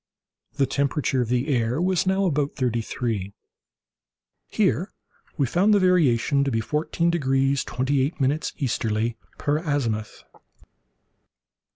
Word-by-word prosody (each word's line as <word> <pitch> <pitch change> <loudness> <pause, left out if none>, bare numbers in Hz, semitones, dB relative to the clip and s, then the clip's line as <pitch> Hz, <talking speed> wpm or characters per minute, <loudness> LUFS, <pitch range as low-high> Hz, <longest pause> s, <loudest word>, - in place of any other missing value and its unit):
The 140 - +2
temperature 140 -1 0
of 120 - -2
the 125 +4 0
air 120 0 +1
was 185 0 +1
now 190 +1 +2
about 145 -4 0
thirty 120 -3 0
three. 110 -5 -3 1.1
Here - - 0 0.5
we 140 - +2
found 190 - +3
the - - +4
variation 145 -7 +3
to 140 - 0
be 115 -3 0
14 160 +7 0
degrees 135 -4 +1
28' 135 +3 0
easterly, 115 -4 -1 0.2
per 145 +1 0
azimuth. 125 -9 -2
140 Hz, 115 wpm, -24 LUFS, 120-155 Hz, 1.1 s, the